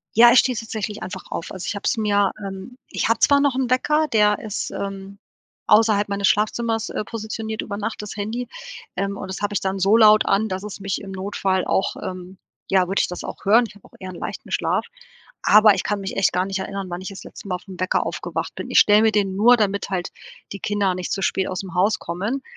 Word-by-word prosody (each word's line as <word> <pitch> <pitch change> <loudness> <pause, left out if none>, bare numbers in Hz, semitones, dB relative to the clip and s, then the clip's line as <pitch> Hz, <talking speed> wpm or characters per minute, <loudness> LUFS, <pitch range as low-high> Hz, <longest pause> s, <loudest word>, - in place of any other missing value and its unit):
Ja, 235 +2 +8
ich 250 - +7
stehe 255 -2 +1
tatsächlich 215 -2 -5
einfach 185 - -7
auf - - -5
also 185 -2 -6
ich - - -2
habe 205 - -6
es - - +2
mir 205 -2 +2
ähm, 195 +6 -8
ich - - -1
habe 230 0 +2
zwar 285 0 +5
noch 280 -2 +2
'n 260 -2 0
Wecker, 300 +5 +2
der 210 -5 +3
ist, 215 -2 -4
ähm, 195 0 -6 0.5
außerhalb 210 -2 +4
meines 200 -1 +1
Schlafzimmers, 225 +1 0
äh, - - -3
positioniert 220 0 -5
über 200 -1 -5
Nacht 215 +1 -4
das 210 - -7
Handy, 225 +4 -3 0.5
ähm, 195 +1 -2
und 190 - -6
das 190 +2 -6
habe 205 0 -1
ich 205 - +1
dann 190 0 -1
so 195 +3 +3
laut 215 -1 +6
an, 215 +3 +2
dass 190 +1 -4
es 210 -1 -7
mich 195 -1 -3
im 195 - -8
Notfall 190 -1 -1
auch 190 - 0
ähm, 185 0 -7 0.3
ja, 185 -2 +4
würde 195 +2 0
ich - - 0
das 180 - -7
auch - - -8
hören. 225 +5 +5
Ich - - -15
habe 205 - -19
auch - - -31
eher 185 - -7
'n - - -10
leichten - - -7
Schlaf, - - 0 0.6
aber 215 0 +7
ich - - -1
kann 205 -1 -1
mich 195 0 -5
echt 195 - +2
gar 180 +1 +1
nicht 195 0 -3
erinnern, 195 0 -5
wann 175 +1 -5
ich 185 - -6
das 195 - -9
letzte - - -11
Mal 185 - -1
auf 180 - -10
'n 185 -2 -10
Wecker 185 0 +1
aufgewacht - - -4
bin. - - -6
Ich - - +5
stell 210 0 +6
mir 220 0 +4
den 200 -2 0
nur, 240 +5 +6
damit 200 -3 0
halt 180 -2 -2 0.4
die 200 - -6
Kinder 200 -2 0
nicht 180 -1 -5
zu 195 - -1
spät 190 0 0
ausm 185 0 -5
Haus 200 +4 +3
kommen, 205 +11 -3
200 Hz, 245 wpm, -22 LUFS, 190-220 Hz, 0.6 s, Ja